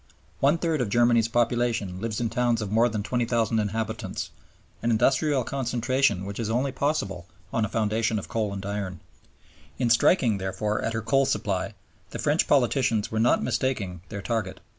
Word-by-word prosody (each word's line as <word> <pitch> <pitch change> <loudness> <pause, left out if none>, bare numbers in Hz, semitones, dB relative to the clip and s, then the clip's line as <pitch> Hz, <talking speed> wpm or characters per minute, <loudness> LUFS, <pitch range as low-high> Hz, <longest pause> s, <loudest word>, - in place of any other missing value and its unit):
One 145 +4 +3
third 165 -4 0
of 115 - -1
Germany's 120 +1 +4
population 115 -5 0
lives 110 -2 -2
in 115 -2 -1
towns 120 -2 +1
of 105 -3 -4
more 115 +3 +4
than 105 -2 -3
20,000 115 -1 0
inhabitants, 110 -1 -3 0.5
an 120 - 0
industrial 130 +4 +2
concentration 125 -5 0
which 100 +2 -6
is 115 -2 -2
only 130 +4 0
possible 105 - -2 0.3
on 115 - +1
a - - -5
foundation 110 0 0
of 100 - -5
coal 110 -3 -1
and 100 -1 -6
iron. 100 -3 -4 0.8
In 120 -3 +1
striking, 115 - +4
therefore, 105 +3 -2
at 115 - -2
her 115 -1 -2
coal 135 +4 +2
supply, 95 0 -1 0.3
the - - -6
French 150 +3 +1
politicians 125 -5 +2
were 110 - -1
not 120 +2 +3
mistaking 115 -8 -1
their 100 -2 -6
target. 110 -5 -2
115 Hz, 170 wpm, -26 LUFS, 105-125 Hz, 0.8 s, Germany's